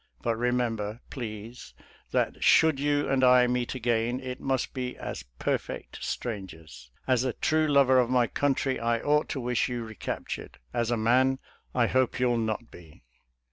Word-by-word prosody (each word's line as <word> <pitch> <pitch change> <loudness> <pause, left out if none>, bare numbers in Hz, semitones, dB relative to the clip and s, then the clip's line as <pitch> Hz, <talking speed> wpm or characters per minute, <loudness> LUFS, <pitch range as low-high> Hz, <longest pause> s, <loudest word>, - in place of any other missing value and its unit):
But 115 - +1
remember, 115 -2 -1
please, 115 -2 -7 0.3
that - - -1
should 160 -3 +5
you 145 0 +1
and 135 -1 +1
I 125 -1 +7
meet 125 +1 -1
again 120 0 0
it 130 -1 -6
must 135 -2 -1
be 125 -1 -4
as - - -6
perfect - - -3
strangers. 80 - -6 0.2
As 130 -2 +2
a 130 -2 -1
true 155 +5 +1
lover 140 -3 +5
of 120 -1 +2
my 125 -1 +3
country 135 +1 0
I 115 0 +1
ought 150 +3 +1
to 135 - -3
wish 125 0 0
you 120 -1 -3
recaptured 110 -2 -6
— 65 - -34
as 120 -1 0
a 120 - +1
man, 130 +4 +3 0.4
I 120 -2 +4
hope 130 +1 +1
you'll 120 -2 +2
not 110 +1 -3
be." 80 -7 -15
125 Hz, 170 wpm, -28 LUFS, 115-130 Hz, 0.4 s, I